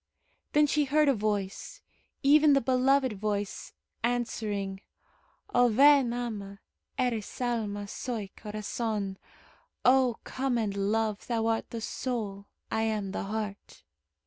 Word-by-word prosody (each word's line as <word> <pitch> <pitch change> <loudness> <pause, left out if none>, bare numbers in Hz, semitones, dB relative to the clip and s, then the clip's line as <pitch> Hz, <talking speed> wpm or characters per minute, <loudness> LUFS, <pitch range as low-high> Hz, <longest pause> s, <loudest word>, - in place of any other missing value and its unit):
Then 300 0 +5
she 295 0 +2
heard 300 +2 +3
a - - +5
voice 205 - -3 0.4
even 295 +1 +6
the 275 - +5
beloved 260 0 +2
voice 205 0 -3 0.3
answering: 215 -5 -2 0.7
"O 245 0 +5
ven! 275 +1 +6
ama! 210 -5 -5 0.4
Eres 240 -5 -2
alma, 215 -5 -2
Soy 215 -2 -4
corazon." 210 -1 -3 0.7
"O 255 -2 +4
come 260 -2 -1
and 210 -3 -1
love 210 +1 0
Thou 230 -2 0
art 225 0 0
the 230 - -5
soul, 215 -5 -4 0.2
I 220 - +1
am 215 -3 -1
the 195 - -3
heart." 210 0 -5
225 Hz, 120 wpm, -29 LUFS, 205-255 Hz, 0.7 s, even